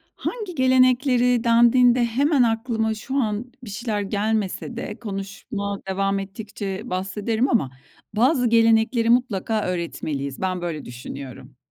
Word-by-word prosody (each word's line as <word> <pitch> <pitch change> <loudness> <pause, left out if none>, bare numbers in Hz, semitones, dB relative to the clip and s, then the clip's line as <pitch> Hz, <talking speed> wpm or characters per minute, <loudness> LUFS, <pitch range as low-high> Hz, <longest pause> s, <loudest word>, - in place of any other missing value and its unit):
"Hangi 420 -8 -5
gelenekleri?" 255 -2 +3
dendiğinde 240 +1 +5
hemen 270 +3 +2
aklıma 225 -1 0
şu 260 +5 -6
an 235 -1 -1
bir 225 - -8
şeyler 210 0 -2
gelmese 210 +2 -2
de 240 - -6
konuşma 200 -1 -5
devam 195 +1 0
ettikçe 200 0 -6
bahsederim 210 +7 -1
ama 200 - +1 0.4
bazı 250 +1 +3
gelenekleri 230 0 +3
mutlaka 225 -3 +1
öğretmeliyiz. 150 -6 -4
Ben 185 -1 -1
böyle 165 -3 -4
düşünüyorum. 130 +1 -9
220 Hz, 120 wpm, -23 LUFS, 195-245 Hz, 0.4 s, dendiğinde